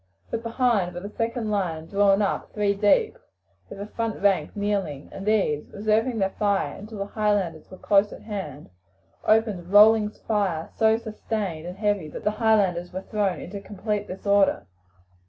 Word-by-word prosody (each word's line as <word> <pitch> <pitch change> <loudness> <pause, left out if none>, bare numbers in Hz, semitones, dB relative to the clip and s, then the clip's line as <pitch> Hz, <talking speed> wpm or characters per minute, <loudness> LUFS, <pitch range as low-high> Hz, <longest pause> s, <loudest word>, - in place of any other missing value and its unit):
But 230 - -2
behind 230 -6 0
were - - -3
the 205 +2 -9
second 230 -1 -2
line 170 -6 -1
drawn 200 +2 +3
up 200 - -2
three 205 -1 +1
deep, 210 - +2 0.5
with - - -9
the 200 - -5
front 225 +1 -3
rank 200 -2 +1
kneeling, 200 -9 -2
and 195 +1 -8
these, 190 -9 +1
reserving 220 +4 0
their 195 -2 +1
fire 200 -1 0
until 215 +2 -9
the 200 - -3
Highlanders 205 -7 -1
were 185 - -11
close 200 +1 +3
at - - -11
hand, 155 - -6 0.5
opened 215 -3 +3
a - - -11
rolling 210 +1 +6
fire 200 -7 -2
so 220 0 +4
sustained 210 -7 -4
and 180 +2 -7
heavy 205 -6 0
that - - -8
the 210 - +2
Highlanders 205 -6 +1
were 185 +1 -5
thrown 205 -4 -1
into 200 +2 -7
complete 205 +1 -3
disorder. 200 - +1
205 Hz, 170 wpm, -25 LUFS, 190-215 Hz, 0.5 s, rolling